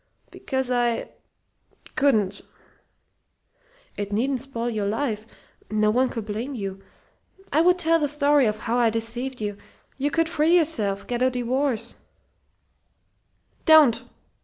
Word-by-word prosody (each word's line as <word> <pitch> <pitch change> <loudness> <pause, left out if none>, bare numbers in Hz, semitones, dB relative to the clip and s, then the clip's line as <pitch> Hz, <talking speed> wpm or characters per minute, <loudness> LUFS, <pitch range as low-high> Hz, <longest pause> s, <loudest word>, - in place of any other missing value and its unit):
"Because 265 -2 -3
I 240 -1 0 0.8
couldn't." 220 -9 +2 1.6
"It 205 0 -4
needn't 250 +5 0
spoil 240 -3 -4
your 215 -4 -1
life. 220 -1 -2 0.4
No 215 0 +2
one 255 +3 +2
could 225 -3 -5
blame 225 +6 -4
you. 195 -3 -5 0.7
I 310 - +4
would 360 +2 +4
tell 330 -1 +2
the 295 - +1
story 285 -2 +3
of 210 0 -1
how 240 +1 0
I 235 -2 +4
deceived 240 +4 -3
you. 205 -2 -4 0.4
You 285 +2 +1
could 330 +2 +1
free 330 +1 +3
yourself 215 - 0
get 245 0 -3
a 255 - +4
divorce 250 0 -1 0.8
" - - -44
"Don't!" 310 -7 +6
245 Hz, 135 wpm, -24 LUFS, 215-285 Hz, 1.6 s, Don't